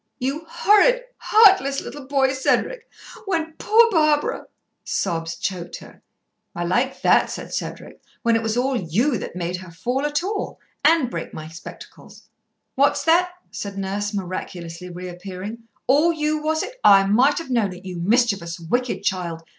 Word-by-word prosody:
"You 275 +6 -3
horrid, - - +4
heartless 385 -11 +5
little 285 -2 -9
boy, 270 -1 +2
Cedric! 460 - 0 0.4
When 325 -4 -1
poor 460 +2 +5
Barbara 305 -4 +1 0.2
" - - -53 0.2
Sobs 165 0 -3
choked 175 0 -4
her. - - -15 0.5
"I 175 - -2
like 245 +10 0
that!" - - +4
said - - -7
Cedric. - - -6 0.2
"When 230 -1 +3
it 225 - +1
was 225 0 -1
all 260 +2 +1
you 225 - 0
that - - -7
made 180 0 -3
her 185 -1 -11
fall 245 +11 -2
at 295 +3 -1
all 405 +2 -4 0.2
and 300 -4 +4
break - - -6
my 155 0 -7
spectacles." 165 +1 -12 0.5
"What's 280 +1 +2
that?" 345 +3 +4 0.2
said 200 -1 -6
Nurse, 200 +1 -2
miraculously 180 -3 -6
reappearing. 185 +5 -7 0.2
"All 295 +6 +4
you, 305 -1 -1
was 315 +1 0
it? - - -8
I 195 -1 +7
might 245 +9 +3
have 330 -6 -5
known 225 -6 +1
it, 180 +1 -11
you 180 -2 -6
mischievous 200 -4 +1
wicked 245 +10 -2
child. 170 -4 -2
240 Hz, 160 wpm, -22 LUFS, 180-300 Hz, 0.5 s, I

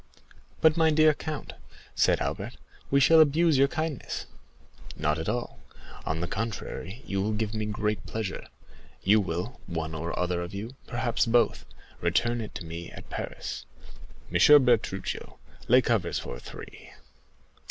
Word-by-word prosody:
"But, 160 0 +5
my 160 -1 +5
dear 155 0 +5
count," 150 0 -6 0.4
said - - +3
Albert, - - -3 0.3
"we 140 - +4
shall 160 +3 +7
abuse 155 -1 +5
your 140 - +6
kindness." 155 -2 -3 0.7
"Not 75 0 0
at 80 - -2
all; 115 - -3 0.5
on 80 +1 -1
the 85 - -1
contrary, 110 +1 -5
you 100 -1 -1
will 105 +2 0
give 105 0 -2
me 110 -1 -2
great 105 -1 -2
pleasure. 110 -4 -4 0.6
You 105 +2 +5
will, 90 +6 -4
one 80 -1 -3
or 85 +2 -4
other 90 -1 0
of 85 +3 -6
you, 105 +4 -5 0.2
perhaps 120 -1 0
both, 120 +1 +2 0.4
return 120 +8 +1
it 110 - -7
to 85 - -6
me 85 +1 -6
at - - -12
Paris. - - -5 0.7
M. 145 -3 +7
Bertuccio, 110 -6 0 0.3
lay 125 +2 +6
covers 100 -8 +1
for - - -5
three." - - -11
110 Hz, 150 wpm, -28 LUFS, 90-130 Hz, 0.7 s, shall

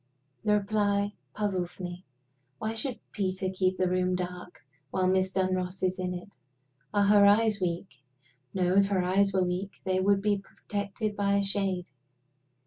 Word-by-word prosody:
The 210 -1 +4
reply 205 0 +1 0.2
puzzles 190 -5 -2
me. 180 0 -6 0.5
Why 220 +6 -2
should 225 +1 -2
Peter 190 -2 -1
keep 185 0 +1
the 185 - +2
room 185 0 +1
dark 180 -2 -6 0.2
while 185 +3 +1
Miss 190 0 +2
Dunross 185 0 -1
is 185 0 +1
in 180 0 -2
it? 180 +3 -8 0.6
Are 205 - +3
her 205 0 +6
eyes 215 0 +4
weak? 170 -6 -3 0.5
No; 180 -1 +1
if 200 0 +5
her 195 -2 +1
eyes 195 +2 +3
were 190 -1 +2
weak, 180 +2 -2
they 185 0 +1
would 195 +1 +3
be 205 -1 +2
protected 205 +1 -4
by 200 0 +2
a 200 - +2
shade. 195 -4 -1
190 Hz, 160 wpm, -29 LUFS, 185-200 Hz, 0.6 s, her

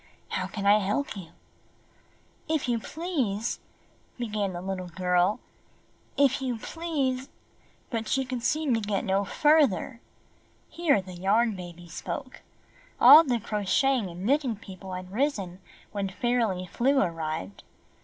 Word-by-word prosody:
How - - -2
can 200 -2 -5
I 205 +1 +6
help 210 +8 -1
you?" 185 -5 -8 1.2
"If 315 -5 0
you 235 -2 +1
please 255 - -2 0.2
— - - -34
" - - -36
began 210 -5 -2
the 175 - -4
Httle 185 -1 -5
girl. 180 +4 +2 0.8
"If 275 -1 +3
you 250 -3 -2
please 275 -3 -2 0.2
— - - -34
" - - -36
but 225 -2 -2
she 270 0 +1
could 250 -1 -4
seem 300 +1 +1
to 225 - +2
get 205 -2 -1
no 195 +1 +1
further. 265 - +2 0.7
Here 300 - +2
the 185 -1 -10
Yarn 205 +5 +2
Baby 175 -1 -9
spoke. 255 - -6 0.6
All 290 +7 +10
the 250 -6 0
Crocheting 215 +3 +1
and 175 +2 -7
Knitting 270 -2 +2
People 190 -2 -10
had 185 0 -7
risen 200 -7 -1 0.3
when 200 -2 -2
Fairly 220 -3 0
Flew 265 +9 +2
arrived. 155 - -3
215 Hz, 145 wpm, -27 LUFS, 190-265 Hz, 1.2 s, All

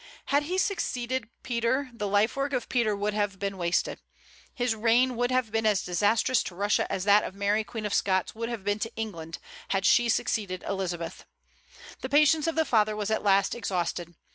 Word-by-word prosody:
Had 285 - +5
he 370 - 0
succeeded 260 - -1
Peter, 255 +2 0
the 210 -3 -3
life 205 +3 +2
work 275 +1 -2
of 250 - -1
Peter 230 -4 +1
would 205 +1 -1
have 205 -2 -1
been 200 0 -3
wasted. 175 -1 -1 0.5
His 245 -2 0
reign 235 +3 +3
would 245 +1 0
have 255 -4 0
been 225 0 +1
as 210 -3 +2
disastrous 205 +8 +2
to 180 - -7
Russia 205 +3 +1
as 185 - -1
that 205 +1 +5
of 190 - -6
Mary 205 +2 +1
Queen 215 0 -6
of 205 - -2
Scots 190 -2 +1
would 230 +1 -4
have 235 -5 -5
been 205 +1 0
to 225 +2 -3
England, 170 -7 -5 0.3
had 195 -1 0
she 240 +4 +4
succeeded 200 -5 -1
Elizabeth. 175 -4 -4 0.8
The 260 - -4
patience 300 +2 +4
of 330 - 0
the 320 0 +2
father 215 -4 +2
was 210 0 -2
at 220 - +1
last 200 -1 +3
exhausted. 175 -5 -3
215 Hz, 195 wpm, -27 LUFS, 195-245 Hz, 0.8 s, Had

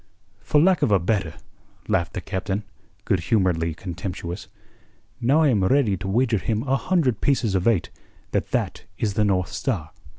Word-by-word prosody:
"For 150 - +2
lack 180 +2 +4
of - - +2
a 100 - +6
better," 95 -2 -1 0.5
laughed 85 0 0
the 95 - -4
Captain, 95 +3 -3 0.4
good 95 - +2
humouredly 85 -4 +1
contemptuous. 90 0 -6 0.7
"Now 135 +7 +3
I 150 - +4
am 105 -7 +2
ready 120 -1 +3
to 95 +2 -5
wager 115 +2 +2
him 110 +3 -1
a 135 -1 +1
hundred 135 - +1
pieces 125 -7 +1
of 95 +1 +1
eight 110 -7 +2 0.4
that - - -1
that - - -2
is 105 -3 -1
the 105 - +2
North 90 -4 +1
Star." 90 - -2
100 Hz, 170 wpm, -24 LUFS, 90-125 Hz, 0.7 s, a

